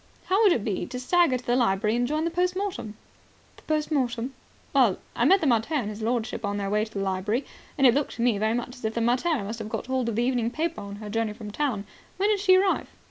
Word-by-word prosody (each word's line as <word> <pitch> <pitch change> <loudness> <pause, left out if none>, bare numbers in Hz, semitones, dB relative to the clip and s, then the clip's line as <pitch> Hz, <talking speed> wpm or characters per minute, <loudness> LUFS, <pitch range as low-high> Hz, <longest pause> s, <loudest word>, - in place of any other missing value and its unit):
How 385 +3 +2
would 415 -4 +6
it 235 - +1
be 205 -4 -2
to 250 - -5
stagger 290 0 +3
to 250 - -13
the 240 - +2
library 215 -2 +2
and 245 0 +1
join 305 +3 -1
the 335 - -1
post 360 +1 0
mortem?" 370 - -4 0.6
"The - - -16
post 310 0 -1
mortem?" 250 -3 -1 0.4
"Well, - - +4 0.2
I - - +2
met 385 0 +5
the - - 0
mater 240 +3 +2
and 225 -8 -1
his 210 +1 -8
lordship 230 0 -1
on 205 0 -1
their 200 -1 -2
way 210 0 +2
to 215 - -14
the 200 - -3
library, 195 +7 -1 0.3
and 275 - +4
it 245 - +7
looked 285 +2 -1
to 235 - -2
me 235 -5 +2
very 220 +2 +1
much 245 +1 -4
as 245 - -15
if 220 0 -2
the 235 - 0
mater 245 +8 +2
must 220 +3 -5
have 215 -1 -5
got 225 -1 -4
hold 260 -2 -1
of 220 - -3
an 235 - +2
evening 245 -2 +1
paper 325 +5 -2
on 200 0 -7
her 210 0 -8
journey 225 -1 -1
from 210 -1 -8
town. 230 -5 -1 0.3
When 400 +3 +2
did 420 -2 +2
she 380 -1 +5
arrive?" 380 0 +2
240 Hz, 270 wpm, -26 LUFS, 215-300 Hz, 0.6 s, it